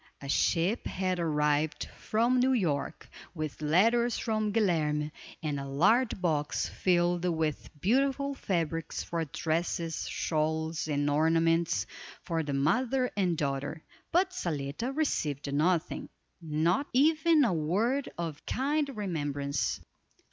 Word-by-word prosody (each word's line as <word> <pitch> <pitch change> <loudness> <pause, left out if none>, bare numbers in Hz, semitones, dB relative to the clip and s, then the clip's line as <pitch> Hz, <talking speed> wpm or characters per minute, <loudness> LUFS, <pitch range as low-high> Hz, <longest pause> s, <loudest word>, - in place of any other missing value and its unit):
A 140 - -8
ship 170 - +1
had 185 -1 -1
arrived 150 -2 +1
from 235 +4 +1
New 260 +1 +3
York, 165 - -1 0.3
with 155 -2 -5
letters 225 +10 +3
from 215 -2 -1
Guilerme, 155 -8 +1 0.3
and 145 -2 -1
a 140 - -5
large 200 - +2
box, 155 -5 0
filled 175 -1 +1
with 160 -3 -1
beautiful 275 - +1
fabrics 165 - -2
for 165 -1 -2
dresses, 165 +2 -2
shawls, 160 0 -1
and 145 -1 0
ornaments, 165 -4 +2 0.4
for 165 -1 -1
the 150 -2 -4
mother 250 - +1
and 180 -5 +1
daughter; 145 +2 -2 0.3
but 370 +2 +3
Zaletta 155 - -3
received 150 - -1
nothing, 165 +3 0 0.3
not 165 - +1
even 310 +3 +4
a 230 - +2
word 205 - 0
of 165 -4 -4
kind 285 +2 0
remembrance. 145 - -2
165 Hz, 120 wpm, -30 LUFS, 150-225 Hz, 0.4 s, even